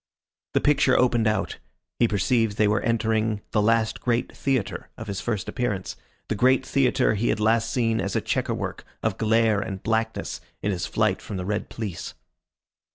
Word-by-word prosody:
The - - +4
picture 145 -3 +4
opened 120 -3 +3
out. 105 - -1 0.4
He 120 - +5
perceived 110 +1 +1
they 105 - +4
were 105 +1 +2
entering 110 -2 0
the 105 - +2 0.4
great 120 -1 0
theatre 130 -7 -1
of 110 - -6
his 100 -2 -4
first 110 -5 -2
appearance, 105 -7 -2 0.3
the - - -1
great 130 +4 +3
theatre 135 -4 +2
he 110 +3 0
had - - +1
last 110 +1 +2
seen 115 -3 +1
as 100 +1 -3
a - - +3
chequer - - -1
work - - -5 0.2
of 110 -3 -1
glare 110 -1 +3
and 95 -1 -5
blackness 110 0 -1 0.2
in 105 - +1
his 90 -2 -2
flight 110 -3 +1
from 100 - -6
the 90 - -4
red 105 +2 -2
police. 105 -6 -5
110 Hz, 175 wpm, -25 LUFS, 105-120 Hz, 0.4 s, He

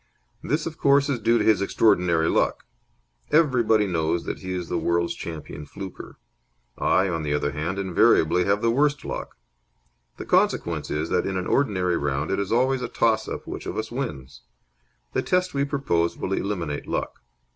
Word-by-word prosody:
This, 150 +3 -1
of 160 -1 -6
course 140 +1 +4
is 130 -4 0
due 115 +2 +3
to - - 0
his 105 -3 +4
extraordinary 90 -5 +2
luck. - - +1 0.7
Everybody 120 -9 +3
knows 85 -2 0
that - - -5
he 95 - -6
is 90 -2 -3
the - - -1
world's 85 0 0
champion 75 -3 -8
fluker. 95 +4 -9 0.6
I, 95 +1 +2
on 85 -3 -2
the 75 -1 -1
other 75 0 -1
hand, 80 +7 -3
invariably 90 -2 +3
have 100 +2 +1
the 115 - +3
worst 145 +2 +1
luck. - - -5 0.8
The - - -7
consequence - - +1
is 75 +2 -2
that - - +1
in 95 -1 -2
an 90 - -2
ordinary 95 -10 +1
round 70 +1 -2
it 95 - 0
is 100 -1 -3
always 130 +2 +2
a 125 - -2
toss 110 -1 +1
up - - -5
which - - -7
of - - -4
us 110 0 -3
wins. 70 - -5 0.7
The - - +1
test 180 0 0
we 140 0 +1
propose 110 - 0
will 95 - -3
eliminate 90 -8 -3
luck. - - -3
95 Hz, 180 wpm, -24 LUFS, 85-120 Hz, 0.8 s, course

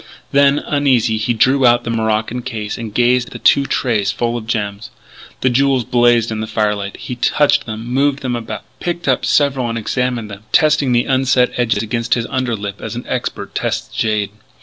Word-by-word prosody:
Then, 140 0 +4
uneasy, 130 -7 +1
he 110 +3 -1
drew 130 +4 +3
out 120 -1 +4
the 115 - -3
morocco 110 +1 -1
case 110 -3 -5
and 115 -2 -6
gazed 125 +2 +2
at - - -12
the - - -6
two 140 -1 +3
trays 105 -6 0
full 120 +3 -2
of 115 -2 -5
gems. 105 -2 -3 0.5
The 130 - +3
jewels 135 0 +2
blazed 120 -2 +3
in 110 - -3
the 110 - -4
firelight. 105 -2 -1
He - - -6
touched 145 +3 +2
them, 110 0 -6
moved 140 +3 0
them 125 -2 -1
about, 110 -3 -6 0.2
picked 175 -2 -4
up 130 -2 +2
several 135 -4 +2
and 115 - -3
examined 120 -1 -2
them, 100 0 -9
testing 150 -5 +3
the 120 0 +2
unset 130 -1 +2
edges 115 -3 0
against 115 +1 0
his 115 -2 -2
under 130 -3 -1
lip 100 -1 -6
as - - -5
an 120 - -6
expert 125 -1 -4
tests - - -3
jade. 105 -2 0
120 Hz, 195 wpm, -17 LUFS, 110-130 Hz, 0.5 s, Then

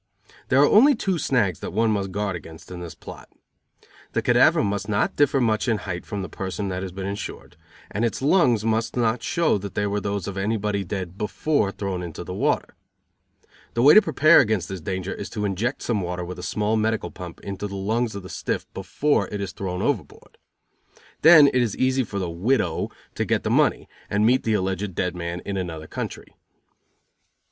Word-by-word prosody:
There 130 - +3
are 145 - +7
only 275 +7 +6
two 190 -6 -1
snags 105 - +1
that - - -6
one 115 0 +2
must 100 -2 -1
guard 100 -1 -2
against 80 +1 -11
in 90 - -6
this 85 -2 -8
plot. - - -11 0.8
The - - 0
cadaver - - +4
must 100 +1 -2
not 100 -1 0
differ 145 -1 +3
much 110 -1 +1
in 115 -2 +2
height 90 -4 -6
from 100 -3 -4
the - - -5
person 95 +2 -4
that 90 0 -3
has 95 -1 -5
been 95 +1 -6
insured; 100 +1 -6 0.4
and 105 - -2
its 115 - 0
lungs 130 - +3
must 115 +2 0
not 115 0 +1
show 165 -11 +1
that 100 0 -7
they 105 - 0
were 100 0 -1
those 100 -1 -3
of 100 -1 -5
anybody 105 -1 -1
dead 95 -1 -5
before 105 0 0
thrown 95 -3 -4
into 85 -3 -6
the - - -7
water. - - 0 1.0
The 115 - +2
way 145 - +9
to 215 - +9
prepare 155 -2 +5
against 105 -7 +1
this 95 -3 -5
danger 95 +3 -3
is - - -7
to 105 -2 -3
inject 110 +7 -2
some 110 -4 0
water 90 0 -3
with 90 +1 -7
a - - -6
small 105 +4 -1
medical 110 0 -1
pump 90 -2 -9
into 100 +1 -5
the 100 - -7
lungs 110 +3 -1
of 100 - -6
the - - -8
stiff - - -3
before 120 +10 0
it 105 - -5
is 100 -2 -4
thrown 90 +1 -4
overboard. 140 -9 -3 0.8
Then 160 -2 +9
it 130 -2 +3
is 115 -5 -1
easy 130 0 +2
for 100 -3 -6
the 95 -2 -1
"widow" 90 +1 0 0.2
to - - -1
get - - 0
the - - -1
money, - - +2 0.2
and 105 +1 +2
meet 125 +3 +4
the 110 -1 +1
alleged 95 -1 -2
dead 90 0 -1
man 85 0 -4
in 100 -1 -3
another 85 -4 -4
country. - - -6
100 Hz, 205 wpm, -24 LUFS, 95-115 Hz, 1.0 s, way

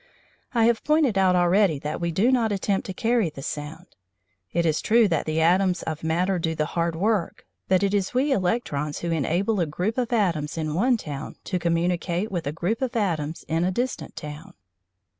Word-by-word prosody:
I 230 -1 +4
have 235 -1 +2
pointed 300 -7 +3
out 190 -1 +4
already 175 -1 +3
that 150 +4 -4
we 170 0 0
do 205 +10 +2
not 235 -4 +2
attempt 195 0 -1
to - - -3
carry 230 -5 +1
the 140 -3 -10
sound. 155 +5 -6 0.7
It 170 0 +1
is 155 -2 +1
true 230 0 +4
that 165 -5 -1
the 155 +1 0
atoms 180 +2 +3
of 160 -1 -5
matter 175 +3 +1
do 165 -1 -1
the 155 - 0
hard 170 -1 0
work, 200 +1 -1 0.2
but 185 +1 +3
it 200 0 +1
is 200 -2 0
we 265 +4 +1
electrons 180 - -1
who 170 - -2
enable 175 +7 0
a 170 - +1
group 185 - -2
of 245 0 -2
atoms 170 -10 0
in 155 -2 -2
one 240 +9 +2
town 145 -9 -7
to 185 - -2
communicate 175 +3 0
with 170 -6 -3
a - - 0
group 175 - -2
of 260 -1 -2
atoms 165 -8 -1
in 165 +1 0
a 180 - +2
distant 245 +7 -3
town. 150 +5 -8
180 Hz, 200 wpm, -25 LUFS, 160-215 Hz, 0.7 s, I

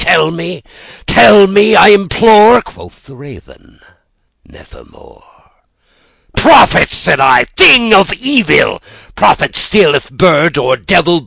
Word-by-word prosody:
—tell 160 0 0
me—tell 180 +3 -1
me, 205 +2 0
I - - +4
implore!"Quoth 215 +3 0
the 135 - -19
Raven, 140 +1 -19 0.6
"Nevermore.""Prophet!" 475 -1 -4
said - - -2
I, - - +1
"thing 250 - +3
of 195 0 +1
evil—prophet 285 - -3
still, 205 -8 0
if 140 - -5
bird 160 +1 -1
or 130 -2 -2
devil! 175 -1 -2
195 Hz, 95 wpm, -8 LUFS, 165-230 Hz, 0.6 s, I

